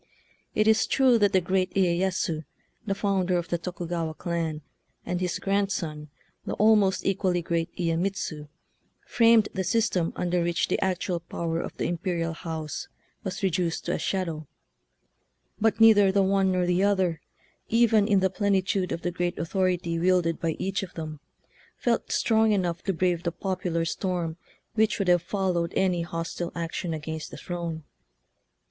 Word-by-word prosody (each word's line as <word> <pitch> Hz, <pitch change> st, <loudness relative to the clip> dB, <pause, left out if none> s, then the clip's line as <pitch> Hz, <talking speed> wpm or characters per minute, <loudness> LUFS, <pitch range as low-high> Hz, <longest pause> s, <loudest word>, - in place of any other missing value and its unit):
It 215 Hz, 0 st, +3 dB
is 220 Hz, 0 st, +4 dB
true 255 Hz, -3 st, +4 dB
that 205 Hz, -2 st, +4 dB
the 190 Hz, -, +4 dB
great 185 Hz, +1 st, 0 dB
Iyeyasu, 180 Hz, -3 st, +1 dB, 0.4 s
the 195 Hz, -, 0 dB
founder 190 Hz, -3 st, +1 dB
of 175 Hz, -, -3 dB
the 170 Hz, -, -1 dB
Tokugawa 170 Hz, -2 st, -4 dB
clan, 165 Hz, -3 st, -3 dB, 0.4 s
and 180 Hz, 0 st, -2 dB
his 180 Hz, -2 st, -1 dB
grandson, 190 Hz, -7 st, -1 dB, 0.3 s
the -, -, -4 dB
almost 210 Hz, -3 st, +3 dB
equally 185 Hz, -2 st, +1 dB
great 165 Hz, 0 st, -1 dB
Iyemitsu, 165 Hz, -3 st, -2 dB, 0.6 s
framed 230 Hz, -2 st, +4 dB
the 190 Hz, -, -1 dB
system 190 Hz, -3 st, +1 dB
under 180 Hz, 0 st, 0 dB
which 170 Hz, 0 st, 0 dB
the -, -, +1 dB
actual 185 Hz, -1 st, -1 dB
power 165 Hz, 0 st, -3 dB
of -, -, -7 dB
the -, -, -1 dB
imperial 170 Hz, -1 st, -1 dB
house 160 Hz, -2 st, -5 dB, 0.4 s
was 190 Hz, 0 st, -5 dB
reduced 175 Hz, -2 st, 0 dB
to 175 Hz, -, -1 dB
a -, -, -1 dB
shadow; 165 Hz, -6 st, -2 dB, 1.1 s
but 225 Hz, -1 st, +2 dB
neither 210 Hz, -3 st, +7 dB
the 195 Hz, 0 st, +3 dB
one 190 Hz, 0 st, +2 dB
nor 180 Hz, -1 st, +1 dB
the 180 Hz, +2 st, +2 dB
other, 190 Hz, -5 st, +1 dB, 0.5 s
even 225 Hz, -2 st, +4 dB
in 200 Hz, -3 st, +3 dB
the 190 Hz, -1 st, +2 dB
plenitude 195 Hz, -1 st, 0 dB
of 165 Hz, -, -3 dB
the 175 Hz, -, -1 dB
great 175 Hz, 0 st, -2 dB
authority 175 Hz, -1 st, 0 dB
wielded 175 Hz, -2 st, +2 dB
by 165 Hz, -2 st, 0 dB
each 195 Hz, -1 st, -1 dB
of 195 Hz, -, -8 dB
them, 155 Hz, -2 st, -6 dB, 0.6 s
felt 235 Hz, -2 st, 0 dB
strong 220 Hz, -1 st, +3 dB
enough 175 Hz, -4 st, -1 dB
to 195 Hz, -, +2 dB
brave 175 Hz, -1 st, 0 dB
the 170 Hz, -, -1 dB
popular 175 Hz, -2 st, -2 dB
storm 170 Hz, -2 st, -2 dB, 0.4 s
which 220 Hz, -1 st, +2 dB
would 195 Hz, -3 st, 0 dB
have 175 Hz, -1 st, +5 dB
follow 185 Hz, -1 st, 0 dB
ed -, -, -9 dB
any 185 Hz, -2 st, +2 dB
hostile 170 Hz, 0 st, -4 dB
action 170 Hz, 0 st, -3 dB
against 160 Hz, 0 st, -5 dB
the -, -, -9 dB
throne. 170 Hz, -3 st, -5 dB
180 Hz, 160 wpm, -26 LUFS, 170-195 Hz, 1.1 s, neither